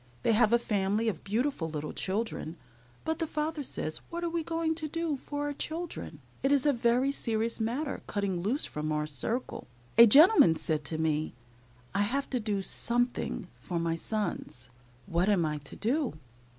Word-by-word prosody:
They - - +3
have 220 0 +4
a 235 - +6
family 210 -1 0
of 180 -8 -5
beautiful 220 - -1
little 150 -1 -4
children, 190 -4 -2 0.5
but 320 0 -1
the 325 - -1
father 305 0 -2
says, 155 - -3
"What 340 +1 -4
are 340 - -1
we 335 0 0
going 330 0 -1
to 315 -1 -4
do 330 0 -1
for 290 +2 -5
our 290 0 -2
children? 325 +4 -4 0.2
It 270 - +2
is 280 -1 +3
a 290 - +4
very 245 +2 +2
serious 230 -3 -1
matter 255 +7 -2
cutting 200 -4 -1
loose 235 - 0
from 155 +1 -3
our 150 0 0
circle." 155 - -2 0.3
A 235 - +11
gentleman 290 - +7
said 155 -1 -1
to 160 - -1
me, 155 -3 0 0.6
"I 200 - +2
have 265 +7 +1
to 255 - +1
do 210 -3 -1
something 245 +4 0
for 175 - -4
my 165 0 0
sons. 165 - -4 0.3
What 180 +1 +1
am 185 -5 +3
I 150 -1 -2
to 140 - -10
do?" 265 +4 0
230 Hz, 180 wpm, -30 LUFS, 175-290 Hz, 0.6 s, A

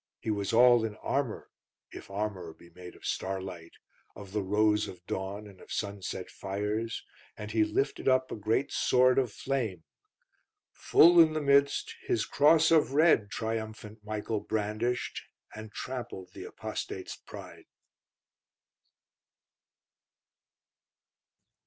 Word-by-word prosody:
He 110 - -2
was 100 -2 -2
all 120 0 +6
in 110 -2 -3
armour, 130 +1 -3 0.4
if - - -10
armour 100 -4 -4
be 85 - -18
made 90 +1 -11
of - - -14
starlight, 95 -3 -4 0.4
of 100 -2 -11
the 105 +1 -1
rose 105 +2 +2
of 90 -1 -11
dawn, 100 +3 -4
and 100 -3 -14
of - - -14
sunset 100 -2 -4
fires; 105 +4 -3 0.3
and 105 0 -7
he 110 0 +3
lifted 120 +6 -1
up 130 0 +3
a - - -3
great 110 +6 0
sword 130 +1 +4
of 125 -5 0
flame. 115 -10 -3 0.9
Full 170 +2 +6
in 160 -2 +7
the 155 - 0
midst, 140 0 +3
his 110 - +1
Cross 155 +2 +4
of 155 -4 +4
Red 145 -9 +4
Triumphant 110 -1 -5
Michael 110 0 -3
brandished, 110 +4 -2 0.3
And 110 0 -9
trampled 120 -7 -6
the - - -8
Apostate's - - -6
pride. - - -12
110 Hz, 125 wpm, -29 LUFS, 100-125 Hz, 0.9 s, in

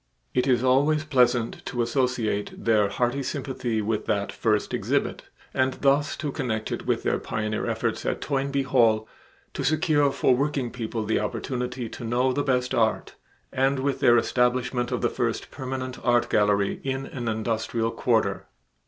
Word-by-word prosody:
It 125 +1 +1
is 125 -2 +3
always 145 +4 +3
pleasant 125 -5 +2
to 120 -2 -1
associate 120 -4 0
their 105 -3 +3
hearty 120 +5 0
sympathy 130 -5 -2
with 110 0 -2
that 100 -1 0
first 105 -2 0
exhibit, - - -1 0.3
and 130 0 +1
thus 145 +1 +2
to 150 -1 -3
connect 110 -7 -3
it - - -4
with - - 0
their - - +1
pioneer 110 -1 -2
efforts - - -1
at - - -1
Toynbee 140 -1 -1
Hall 115 -5 +3 0.5
to - - -3
secure 150 -1 +2
for 135 -1 +3
working 135 -2 -1
people 115 -2 -4
the 110 - +1
opportunity 125 +3 -3
to 120 - -8
know 125 +3 +1
the 145 - 0
best 125 -2 0
art, 115 -3 +1 0.4
and 135 +1 +2
with 135 0 -1
their 120 0 +5
establishment 125 0 +1
of - - -1
the - - +3
first - - -2
permanent 130 -1 -5
art 120 -1 +2
gallery 105 -1 +2
in 135 0 -2
an 120 -3 -6
industrial 115 +1 -1
quarter. - - 0
125 Hz, 160 wpm, -25 LUFS, 115-135 Hz, 0.5 s, their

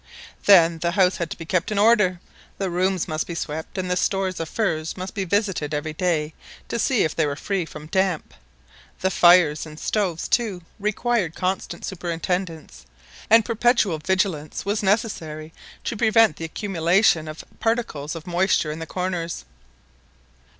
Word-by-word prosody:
Then 170 -4 +6
the 170 +1 -1
house 190 -2 +3
had 170 -1 -3
to - - -6
be 165 - -8
kept 180 +4 0
in 210 - -1
order, 205 -4 +4 0.4
the 195 -2 -2
rooms 185 0 0
must 155 0 -2
be 170 - -5
swept, 160 +3 -5
and 185 -1 -2
the - - +2
stores 190 0 0
of 165 -1 -4
furs 165 -8 -1
must 185 +1 -6
be 200 -3 -2
visited 185 -6 0
every 155 +1 -3
day 155 -2 0 0.4
to 235 - -2
see 235 +1 +2
if 160 - -1
they 160 -2 +2
were 140 - -2
free 190 +3 -2
from 155 -1 -10
damp; 190 0 -1 0.7
the 190 - +1
fires 175 -4 +5
and 155 -1 -10
stoves, 185 -6 -1
too, 210 -8 0 0.2
required 210 -3 0
constant 185 -2 -3
superintendence, 170 - -4 0.4
and 225 -1 +6
perpetual 230 -7 +2
vigilance 180 -3 -1
was 205 +1 0
necessary 170 -7 -1 0.3
to - - -3
prevent 220 -6 +4
the 165 - -5
accumulation 170 -1 +2
of 155 +1 -8
particles 215 -10 -1
of 165 0 -8
moisture 175 -3 +1
in 155 - -6
the 165 - -6
corners. 180 -2 -3
180 Hz, 165 wpm, -23 LUFS, 160-200 Hz, 0.7 s, Then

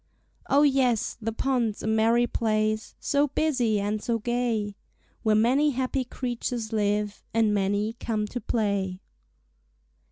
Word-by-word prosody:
Oh, 285 +2 +5
yes! 265 -6 +2
the 225 +1 -2
pond's 235 -3 -1
a - - -2
merry 225 +2 +3
place, 215 -2 -1
So 285 +1 +2
busy 255 -8 +1
and 205 +1 -1
so 235 +1 0
gay, 230 -3 -1 0.5
Where 215 -1 +3
many 255 +7 +3
happy 260 0 -1
creatures 240 -2 -4
live 210 -1 0
And 220 -2 +3
many 205 +2 0
come 215 -2 -1
to 245 - -5
play. 200 -5 -1
225 Hz, 130 wpm, -26 LUFS, 210-245 Hz, 0.5 s, Oh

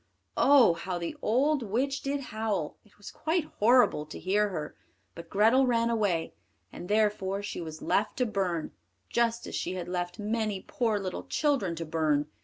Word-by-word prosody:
Oh! 270 -10 +6
how 175 +2 -4
the 170 -1 -4
old 275 +6 +2
witch 255 +6 -1
did 280 0 -2
howl, 215 - -3
it 210 - -26
was 205 - -10
quite 320 +1 -1 0.2
horrible 215 -9 +4
to - - -8
hear 205 +3 +1
her. 155 -6 -5 0.4
But 170 - -10
Grethel 225 +6 +4
ran 235 -1 +2
away, 200 -8 0 0.4
and 180 - -8
therefore 205 -2 +1
she 200 - -5
was 160 -1 -7
left 210 - 0
to 250 - +2
burn, 185 -7 -2 0.4
just 235 0 0
as - - -8
she 180 - -2
had 180 -1 -5
left 175 +1 -3
many 215 -2 -2
poor 225 -4 0
little 185 -2 -5
children 275 - 0
to 165 0 -5
burn. 155 -2 +1
210 Hz, 175 wpm, -29 LUFS, 175-235 Hz, 0.4 s, Oh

